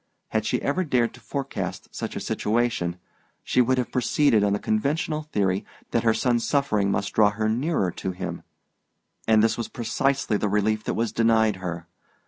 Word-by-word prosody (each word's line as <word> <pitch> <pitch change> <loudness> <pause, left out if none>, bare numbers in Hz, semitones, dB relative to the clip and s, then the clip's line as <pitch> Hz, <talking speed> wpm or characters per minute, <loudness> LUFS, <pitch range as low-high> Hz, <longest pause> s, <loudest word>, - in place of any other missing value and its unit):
Had 110 0 -1
she - - +1
ever 175 +7 +1
dared 125 -7 +1
to - - -14
forecast 135 - -5
such - - -5
a - - -2
situation, 110 -6 0 0.5
she 125 - +2
would 130 +1 +2
have 125 - -1
proceeded 125 -3 +3
on 100 - +2
the 100 - +2
conventional 150 +9 -1
theory 95 -1 +1 0.3
that 115 - +2
her 115 - +3
son's 120 -2 +1
suffering 110 -9 +1
must 100 0 -1
draw 105 -2 +5
her 110 +1 -2
nearer 120 - 0
to 95 - -4
him; 90 -1 -5 0.9
and 110 -1 +5
this 115 +1 +2
was 115 - -2
precisely 120 0 0
the 105 - -1
relief 105 +1 +1
that - - -1
was 115 -1 0
denied 110 -3 +3
her. 85 -2 -5
110 Hz, 180 wpm, -25 LUFS, 100-125 Hz, 0.9 s, draw